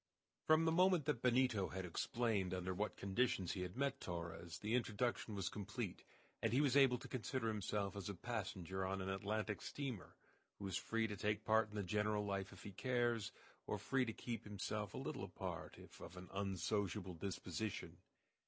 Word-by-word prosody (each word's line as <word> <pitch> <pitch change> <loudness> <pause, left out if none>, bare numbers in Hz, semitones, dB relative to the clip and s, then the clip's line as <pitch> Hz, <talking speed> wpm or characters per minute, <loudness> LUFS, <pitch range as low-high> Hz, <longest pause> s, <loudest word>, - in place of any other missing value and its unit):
From 155 +1 +6
the 160 - +4
moment 180 -2 +5
that 145 -6 +1
Benito 125 -5 +4
had 95 0 -3
explained 100 0 +1
under 90 0 -1
what 105 +2 -1
conditions 100 -2 +1
he 95 - -2
had 90 +4 -4
met 140 0 +1
Torres 85 -1 -4
the 105 +2 -2
introduction 120 -2 +1
was 95 -2 -1
complete, 100 -2 -3 0.4
and - - +2
he 125 - +4
was 140 -3 +4
able 135 -3 +7
to - - -8
consider 125 -1 -1
himself 105 -1 -1
as 100 -1 -3
a 100 - -3
passenger 95 -3 -2
on 95 +1 0
an 95 - -2
Atlantic 105 +1 -1
steamer, 130 -9 -4 0.4
who 100 - -5
is 95 - -2
free 115 +3 +1
to 105 -2 -2
take 105 +2 0
part 110 0 +4
in 105 - -10
the 105 - 0
general 105 +2 +1
life 100 -1 -1
if - - -11
he 100 - -6
cares, 120 +2 +1 0.4
or - - 0
free 130 -1 +2
to 115 - -1
keep 115 +1 -4
himself 105 0 -3
a - - -3
little - - -3
apart - - -4
if - - -12
of 85 +2 -9
an 90 0 -8
unsociable 95 -1 0
disposition. 95 +3 -3
105 Hz, 190 wpm, -41 LUFS, 95-120 Hz, 0.4 s, able